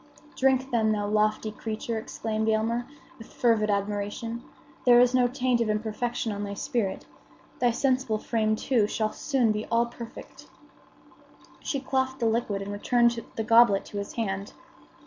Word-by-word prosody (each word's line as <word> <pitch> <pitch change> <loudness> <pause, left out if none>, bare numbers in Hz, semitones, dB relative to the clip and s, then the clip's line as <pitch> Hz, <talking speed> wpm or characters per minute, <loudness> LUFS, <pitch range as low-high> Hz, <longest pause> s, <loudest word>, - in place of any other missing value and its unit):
"Drink, 265 0 +2
then, 220 -2 +2
thou 205 -1 -1
lofty 215 +1 +1
creature!" 220 +1 -4
exclaimed 220 0 -2
Aylmer, 230 +2 0 0.3
with 225 - -12
fervid 225 -3 +2
admiration. 205 +3 -2 0.4
"There 240 -1 +7
is 245 0 +5
no 250 -1 +4
taint 250 -1 0
of 225 - 0
imperfection 220 +2 -2
on 205 0 -4
thy 200 0 -4
spirit. 225 -4 -2 0.5
Thy 245 - +3
sensible 255 -2 +1
frame, 215 0 0
too, 225 -2 +1
shall 215 0 -1
soon 260 -6 +1
be 215 0 -3
all 230 +1 +2
perfect." 235 -1 -11 1.1
She 275 - -2
quaffed 260 0 -1
the 235 - 0
liquid 220 -3 0
and 200 - -6
returned 235 +2 +2
the 225 - -2
goblet 230 -3 +5
to 205 - -6
his 200 - -6
hand. 200 -3 -3
225 Hz, 155 wpm, -27 LUFS, 215-240 Hz, 1.1 s, There